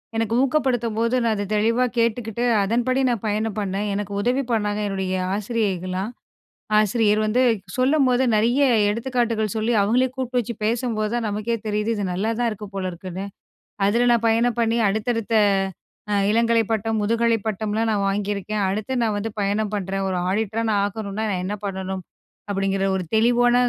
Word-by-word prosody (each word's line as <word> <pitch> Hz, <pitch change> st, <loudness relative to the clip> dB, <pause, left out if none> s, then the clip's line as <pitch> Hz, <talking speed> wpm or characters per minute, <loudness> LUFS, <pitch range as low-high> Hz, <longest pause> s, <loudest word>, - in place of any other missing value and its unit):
எனக்கு 225 Hz, 0 st, 0 dB
ஊக்கப்படுத்தும்போது 245 Hz, -4 st, +1 dB
நான் 225 Hz, -1 st, +2 dB
அத 205 Hz, -1 st, -3 dB
தெளிவா 230 Hz, +4 st, +2 dB
கேட்டுகிட்டு, 230 Hz, 0 st, 0 dB, 0.2 s
அதன்படி 245 Hz, +5 st, +1 dB
நான் 230 Hz, -3 st, -2 dB
பயணம் 215 Hz, 0 st, -1 dB
பண்ணேன். 200 Hz, +1 st, -2 dB
எனக்கு 205 Hz, 0 st, -4 dB
உதவி 255 Hz, +5 st, +1 dB
பண்ணாங்க, 210 Hz, -1 st, 0 dB
என்னுடைய 190 Hz, -1 st, -2 dB, 0.2 s
ஆசிரியைகள்லாம். 200 Hz, -2 st, -2 dB, 0.7 s
ஆசிரியர் 215 Hz, 0 st, +2 dB
வந்து 235 Hz, +4 st, +2 dB, 0.4 s
சொல்லும்போது 260 Hz, -1 st, +3 dB
நெறைய 240 Hz, +6 st, +3 dB, 0.3 s
எடுத்துக்காட்டுகள் 230 Hz, -2 st, -1 dB
சொல்லி 220 Hz, +2 st, 0 dB
அவங்களே 245 Hz, +6 st, +3 dB
கூப்பிட்டு 255 Hz, -1 st, -1 dB
வச்சு 235 Hz, 0 st, -3 dB
பேசும்போது 225 Hz, -2 st, -1 dB
தான் 240 Hz, -1 st, -1 dB
நமக்கே 215 Hz, +3 st, -1 dB
தெரியுது, 210 Hz, +1 st, -1 dB
"இது 205 Hz, -, -2 dB
நல்லா 210 Hz, +5 st, -1 dB
தான் 240 Hz, -1 st, +2 dB
இருக்கு 210 Hz, -1 st, -6 dB
போல 190 Hz, -1 st, -2 dB
இருக்குன்னு." 185 Hz, +2 st, -6 dB, 0.6 s
அதுல 235 Hz, +5 st, +3 dB
நான் 230 Hz, -1 st, +2 dB
பயணம் 235 Hz, +1 st, +1 dB
பண்ணி 230 Hz, +1 st, +1 dB
அடுத்தடுத்த 225 Hz, +2 st, -1 dB, 0.8 s
அ -, -, +3 dB
இளங்கலை 230 Hz, +1 st, +3 dB
பட்டம், 225 Hz, 0 st, 0 dB
முதுகலை 230 Hz, +2 st, +2 dB
பட்டம்லாம் 215 Hz, +1 st, -1 dB
நான் 205 Hz, -2 st, 0 dB
வாங்கியிருக்கேன். 205 Hz, +1 st, -2 dB
அடுத்து 215 Hz, +6 st, -3 dB
நான் 220 Hz, -2 st, +1 dB
வந்து 220 Hz, +2 st, -3 dB
பயணம் 205 Hz, +1 st, 0 dB
பண்றேன். 195 Hz, 0 st, -2 dB
ஒரு 185 Hz, -, -1 dB
ஆடிட்டரா 220 Hz, +3 st, -1 dB
நான் 205 Hz, -1 st, +2 dB
ஆகணுனா 205 Hz, +1 st, -3 dB
நான் 180 Hz, -2 st, -1 dB
என்ன 200 Hz, -, -2 dB
பண்ணணும்? 190 Hz, -1 st, -3 dB, 0.5 s
அப்படிங்கிற 195 Hz, 0 st, 0 dB
ஒரு 185 Hz, -, -1 dB
தெளிவான 240 Hz, +2 st, +4 dB
220 Hz, 155 wpm, -23 LUFS, 205-235 Hz, 0.8 s, தெளிவான